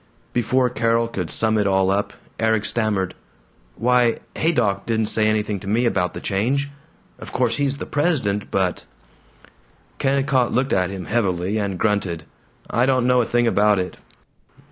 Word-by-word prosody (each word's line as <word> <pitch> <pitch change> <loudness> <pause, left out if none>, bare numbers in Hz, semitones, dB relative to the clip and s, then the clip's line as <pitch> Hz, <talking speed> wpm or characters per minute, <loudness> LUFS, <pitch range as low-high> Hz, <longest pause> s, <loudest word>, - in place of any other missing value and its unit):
Before 125 +2 +2
Carol 115 -1 +1
could 90 -7 -4
sum 110 +8 +1
it 105 - +1
all 95 -1 +2
up, 100 +1 0 0.3
Erik 110 -1 +1
stammered, 105 -5 0 0.6
"Why, 125 -1 +2 0.2
Haydock 100 -12 +1
didn't 110 -2 0
say 110 -1 +2
anything 105 -1 0
to 95 - -10
me 115 +4 +2
about 90 -6 0
the - - -4
change. 130 +8 -1 0.5
Of - - -9
course 125 -2 +1
he's 140 -1 0
the - - -5
president, 135 - 0
but 95 -2 -1 0.5
" - - -30
Kennicott 135 -2 +1
looked 130 +2 0
at 90 -1 +1
him 95 -2 -6
heavily, 100 -2 0
and 100 -3 -2
grunted, 95 -6 -1 0.4
"I 120 +3 +1
don't 130 -2 +2
know 125 0 +4
a 115 - -2
thing 120 0 +2
about 105 -2 +3
it. 90 0 -3
110 Hz, 165 wpm, -22 LUFS, 100-125 Hz, 0.6 s, know